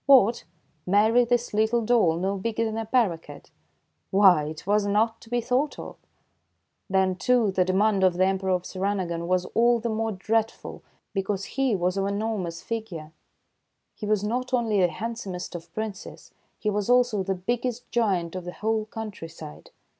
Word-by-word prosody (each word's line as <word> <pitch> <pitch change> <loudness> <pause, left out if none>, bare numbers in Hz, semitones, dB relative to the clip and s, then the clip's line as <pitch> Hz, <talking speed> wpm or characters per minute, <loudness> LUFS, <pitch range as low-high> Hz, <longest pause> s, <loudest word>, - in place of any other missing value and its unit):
What, 240 - +5 0.4
marry 220 +5 +4
this 240 -1 0
little 220 +2 +2
doll, 215 -8 +3
no 190 +3 -1
bigger 225 +3 -1
than 220 -1 -3
a 225 - -4
paroquet! 210 -10 0 0.7
Why, 190 -6 +5
it 155 +2 -7
was 205 +1 +2
not 220 +3 +1
to 225 - -15
be 245 0 0
thought 255 +5 0
of! - - -8 0.9
Then, 190 -1 +2
too, 230 +2 +2
the 185 -1 +2
demand 195 +2 +2
of 185 -2 +4
the 185 +1 +3
Emperor 190 0 0
of 180 -1 +1
Sirinagon 185 -3 -2
was 180 0 +1
all 240 +1 +4
the 230 +1 -2
more 225 0 -1
dreadful, 220 +3 -2 0.3
because 195 0 -2
he 270 -5 +1
was 180 +1 0
of 195 - +1
an 200 0 -1
enormous 200 -6 -3
figure. 195 -9 -5 0.8
He 210 - -7
was 210 -1 +1
not 255 +4 -1
only 220 -5 +1
the 180 - +5
handsomest 195 -1 -5
of 170 -1 -8
Princes, 215 -3 -6 0.3
he 210 - -1
was 205 +1 -2
also 245 -4 +3
the 190 0 -1
biggest 240 +5 -3
giant 190 -8 0
of 185 - -4
the 180 - -6
whole 220 0 -1
countryside. 165 - -9
205 Hz, 170 wpm, -26 LUFS, 185-225 Hz, 0.9 s, What